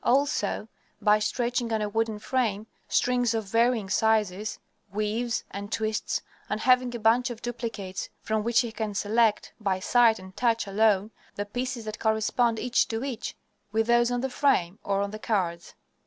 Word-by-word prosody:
Also 250 -5 +1 0.3
by 210 0 +4
stretching 235 +2 -1
on 220 - +1
a 210 - -1
wooden 225 +1 -1
frame, 215 -3 -1 0.2
strings 245 -2 +2
of 220 - 0
varying 230 0 +2
sizes, 210 -1 +1 0.3
weaves, 215 +3 -1
and 200 +1 -6
twists, 220 -1 -1 0.3
and 215 - -1
having 250 0 +3
a - - -4
bunch 230 +3 +3
of 235 -1 -8
duplicates 225 -6 -4
from 220 -1 -1
which 235 +1 +3
he 235 -2 -4
can 215 -2 -4
select, 215 +2 +2
by 195 -3 0
sight 230 +2 +4
and 185 0 -12
touch 230 -2 +1
alone, 205 0 +2 0.2
the 205 - -3
pieces 245 +2 -4
that 215 0 -5
correspond, 225 +1 +1
each 250 +2 +2
to 225 0 -3
each, 255 -4 -4 0.4
with 220 +1 +2
those 240 +1 +4
on 245 0 -1
the 265 - -1
frame 225 -10 +1
or 200 0 0
on 200 0 -2
the 215 - -7
cards. 175 -7 -2
220 Hz, 170 wpm, -27 LUFS, 210-240 Hz, 0.4 s, by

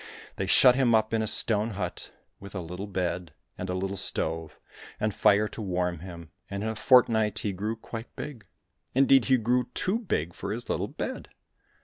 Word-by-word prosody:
They 95 - -2
shut 125 +6 +7
him 125 -3 +3
up 110 0 +1
in 110 - +2
a 110 - -1
stone 110 +1 +2
hut, - - -4 0.3
with 100 +1 -11
a - - -2
little 90 +4 -6
bed 90 -4 -3 0.2
and 90 - -6
a 90 - -1
little 95 +1 -2
stove 80 -3 -2 0.4
and 105 -1 0
fire 105 +3 +4
to 110 - -8
warm 90 -3 -1
him, 85 -3 -10 0.2
and 100 +1 -4
in 110 - -1
a 110 - -3
fort 125 +3 +6
night 110 -2 0
he 105 - +1
grew 105 +4 -3
quite 115 +1 -9
big, 120 -10 -8 0.5
indeed 135 -1 +5
he 130 - +4
grew 125 +2 +1
too 200 +5 0
big 85 - -2
for - - -5
his - - -2
little - - -1
bed. - - -5
105 Hz, 200 wpm, -27 LUFS, 90-115 Hz, 0.5 s, shut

